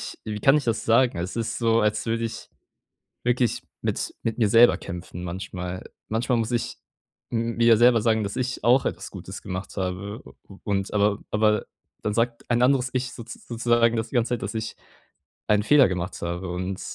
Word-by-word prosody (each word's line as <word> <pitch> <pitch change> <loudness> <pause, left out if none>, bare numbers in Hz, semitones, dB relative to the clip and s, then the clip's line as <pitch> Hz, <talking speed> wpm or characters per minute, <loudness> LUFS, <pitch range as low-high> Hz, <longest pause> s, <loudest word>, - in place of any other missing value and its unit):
ich - - -7
wie 105 -1 -4
kann 135 +2 +5
ich 150 - 0
das 115 -2 -1
sagen? 115 -4 +3
Es 90 +6 -4
ist 115 0 -2
so, 115 -1 +3
als 105 0 +1
würde 115 0 0
ich 115 0 -6 0.8
wirklich 120 -1 +1 0.2
mit - - -2
mit 115 - -2
mir 110 -4 +3
selber 120 +2 +6
kämpfen 90 0 -7
manchmal. 90 0 -5 0.3
Manchmal 120 +3 +1
muss 115 +1 -1
ich 120 - -2 0.5
m 115 0 -1
mir 115 0 +4
ja 115 -2 +7
selber 120 -1 +5
sagen, 110 -1 +2
dass 100 +2 -4
ich 125 -2 -3
auch 125 +3 +4
etwas - - -4
Gutes - - -8
gemacht 95 +2 -6
habe. 95 +3 -3
U - - -12 0.2
u 100 - -13
und 100 0 -1
aber 105 0 +2
aber 105 0 +2 0.4
dann 105 - -1
sagt 115 +2 -1
ein 120 0 +2
anderes 130 0 +3
ich 125 -1 -1
so 115 - -8
sozusagen 120 0 +1
das 110 0 -2
die - - -8
ganze 120 -1 +2
Zeit, 120 - -9
dass - - -4
ich 110 0 -4 0.7
einen 105 -1 +3
Fehler 140 +3 +6
gemacht 90 +1 -4
habe. 85 +2 -3
Und 90 +2 -4
115 Hz, 200 wpm, -25 LUFS, 100-120 Hz, 0.8 s, ja